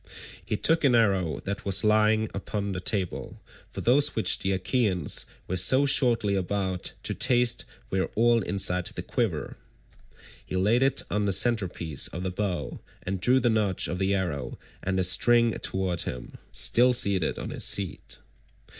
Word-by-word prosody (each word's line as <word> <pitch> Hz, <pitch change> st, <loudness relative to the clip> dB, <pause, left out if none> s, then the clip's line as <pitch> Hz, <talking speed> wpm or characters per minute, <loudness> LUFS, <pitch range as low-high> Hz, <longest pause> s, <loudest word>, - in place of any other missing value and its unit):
He 105 Hz, -, -3 dB
took 165 Hz, +7 st, +2 dB
an 130 Hz, -4 st, +3 dB
arrow 95 Hz, -8 st, 0 dB
that 100 Hz, +1 st, -5 dB
was 100 Hz, +1 st, +3 dB
lying 110 Hz, +1 st, +2 dB
upon 100 Hz, +1 st, -4 dB
the 90 Hz, -1 st, -5 dB
table165—for 95 Hz, -1 st, -5 dB
those 140 Hz, +4 st, +2 dB
which 110 Hz, -, +1 dB
the 95 Hz, -, -2 dB
Achaeans 95 Hz, -, 0 dB, 0.2 s
were 95 Hz, -, -2 dB
so 130 Hz, +10 st, +4 dB
shortly 120 Hz, -6 st, +2 dB
about 95 Hz, -1 st, -3 dB
to -, -, -1 dB
taste 120 Hz, +1 st, +2 dB, 0.3 s
were 95 Hz, 0 st, -1 dB
all 115 Hz, +1 st, +3 dB
inside 90 Hz, -3 st, 0 dB
the -, -, -6 dB
quiver—he -, -, -7 dB
laid 105 Hz, +7 st, +1 dB
it 135 Hz, 0 st, +2 dB
on 105 Hz, 0 st, -1 dB
the -, -, +1 dB
centre 110 Hz, -1 st, +2 dB
piece 80 Hz, -5 st, -1 dB
of 90 Hz, -, -7 dB
the 95 Hz, -, -3 dB
bow, 90 Hz, -7 st, -4 dB, 0.2 s
and 95 Hz, 0 st, -4 dB
drew 125 Hz, +6 st, +3 dB
the 120 Hz, -2 st, +1 dB
notch 105 Hz, -4 st, 0 dB
of 90 Hz, -, -5 dB
the 95 Hz, +1 st, 0 dB
arrow 90 Hz, -7 st, -4 dB, 0.2 s
and 95 Hz, 0 st, -2 dB
the 95 Hz, -, +1 dB
string 115 Hz, +6 st, +4 dB
toward 95 Hz, -2 st, -1 dB
him, 60 Hz, -, -6 dB, 0.2 s
still 125 Hz, +2 st, +3 dB
seated 100 Hz, -8 st, +2 dB
on -, -, -6 dB
his -, -, +1 dB
seat. 100 Hz, -3 st, +1 dB
100 Hz, 165 wpm, -26 LUFS, 95-115 Hz, 0.3 s, so